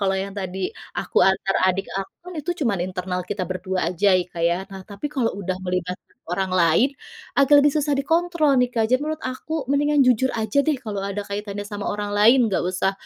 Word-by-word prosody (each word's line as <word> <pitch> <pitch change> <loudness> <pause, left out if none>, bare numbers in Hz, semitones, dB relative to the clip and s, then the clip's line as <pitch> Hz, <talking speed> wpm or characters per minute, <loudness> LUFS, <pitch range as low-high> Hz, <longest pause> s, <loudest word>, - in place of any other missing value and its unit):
Kalau 195 -1 +1
yang 195 +1 -4
tadi 190 -1 -3 0.3
aku - - 0
antar 190 0 +2 0.2
adik 195 +2 -3
aku, 195 - -6
kan 360 - -8
itu 310 +4 -3
cuman 205 -6 +1
internal 180 0 -3
kita 195 +1 -4
berdua 185 -1 -2
saja 195 +3 +3
ya 180 - 0
Kak 170 - -4
ya. 175 +1 0
Nah, 190 -1 -8
tapi 205 +6 -6
kalau 245 -5 +1
sudah 185 -2 -3
melibatkan 180 0 -4
orang 190 +1 -1
lain, 170 - +4 0.5
agak 285 +1 +6
lebih 285 0 +4
susah 295 -1 0
dikontrol 325 0 +2
nih, 250 - +2
Kak. 225 -2 +1
Jadi 255 - +4
menurut 310 +1 -3
aku 275 +4 -4
mendingan 290 +2 +2
jujur 255 +1 +3
aja 220 +6 +1
deh 305 0 +1
kalau 215 -5 -5
ada 200 +1 -3
kaitannya 205 0 -5
sama 205 -1 -5
orang 205 0 -3
lain, 230 +5 +6
nggak 200 - 0
usah, 190 +1 0
205 Hz, 205 wpm, -23 LUFS, 190-270 Hz, 0.5 s, agak